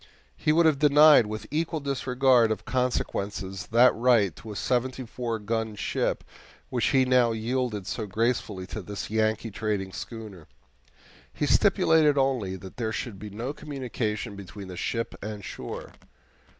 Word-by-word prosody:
He 155 - +1
would 165 +2 +4
have 155 -4 +3
denied 150 -4 +7
with 110 0 -5
equal 160 +1 -1
disregard 130 -3 +2
of 110 - -3
consequences 100 -6 -2
that 120 +2 +6
right 115 -7 +3
to 110 - -9
a - - -7
seventy 130 +3 -1
four 115 -1 -3
gun 110 0 -2
ship - - -1 0.5
which 120 -4 +1
he 130 -1 +4
now 125 -2 +3
yielded 115 -2 -2
so 110 +2 -4
gracefully 110 -3 -1
to 105 +3 -6
this 100 +1 -6
Yankee 110 0 0
trading 100 -2 -2
schooner. 105 -7 -8 0.8
He - - -2
stipulated 155 -3 +4
only 130 -9 +1
that 95 0 -11
there 115 -2 -2
should 110 -3 -5
be 105 +2 -7
no 115 +7 -4
communication 125 -8 -4
between 100 0 -9
the 90 - -7
ship 115 +6 -2
and 105 -1 -6
shore. - - -7
115 Hz, 150 wpm, -27 LUFS, 105-130 Hz, 0.8 s, denied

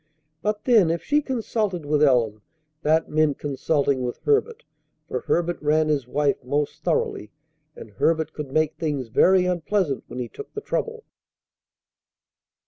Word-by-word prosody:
But 210 0 -2
then, 220 -9 +5
if 165 +1 -1
she 295 +1 +2
consulted 220 - -2
with 150 0 +1
Ellen 120 -7 +3 0.4
that 160 +1 +2
meant 155 -2 +1
consulting 140 -1 0
with 125 -1 -3
Herbert; 455 +2 +1 0.4
for - - -2
Herbert 175 0 -1
ran 155 +1 +2
his 140 -5 0
wife 140 +1 0
most 145 +3 -2
thoroughly, 105 - -1 0.5
and 110 - -11
Herbert 160 +10 0
could 150 -3 -6
make 155 +1 +1
things 145 -7 -2
very 185 +10 +4
unpleasant 180 -4 0
when - - -9
he 125 -1 -3
took 425 - -10
the 425 - -3
trouble. 460 +1 -3
155 Hz, 145 wpm, -24 LUFS, 140-190 Hz, 0.5 s, then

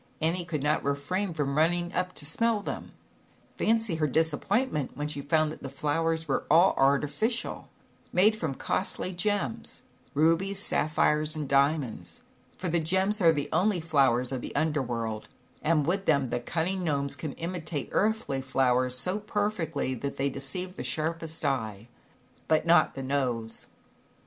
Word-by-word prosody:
Annie 170 +2 0
could 155 -5 -3
not 150 +1 +1
refrain 170 +8 -1
from 145 -4 -2
running 175 +3 +1
up 180 0 -1
to 145 - -7
smell 225 +7 +1
them. - - -6 0.7
Fancy 225 -6 +1
her 155 -1 +1
disappointment, 160 - 0
when 145 0 -2
she 145 -1 -3
found 155 +2 +2
that - - -10
these 135 - -6
flowers 160 +3 0
were 135 - 0
all 170 +5 +6
arti 140 +2 +3
ficial, 225 - -2 0.5
made 210 +5 +4
from 160 -10 -3
costly 185 +3 -1
gems, 180 - -2 0.3
rubies, 165 +6 +2
sapphires 155 -4 +1
and 150 -2 -3
diamonds 135 - 0 0.3
for 185 - -3
the 170 0 +2
gems 190 +6 +1
are 165 -2 +7
the 145 -2 -2
only 195 -1 +2
flowers 135 -6 +2
of 130 -2 -3
the - - -7
Under 150 0 +1
World 115 -3 -4 0.3
and 155 -2 +2
with 195 +4 0
them 140 -5 +2
the 120 - 0
cunning 175 +8 -2
Gnomes 140 -4 -1
can 155 -4 -5
imitate 165 -4 -4
earthly 210 -11 0
flowers 130 -1 +1
so 185 +8 0
perfectly, 205 -10 -1
that 140 +3 -4
they 140 +1 0
deceive 180 +8 -4
the - - -4
sharpest 160 0 -3
eye 115 -5 -2 0.6
but 155 0 +2
not 170 +1 +4
the 135 - -5
nose. 125 -5 -2
155 Hz, 160 wpm, -28 LUFS, 140-180 Hz, 0.7 s, are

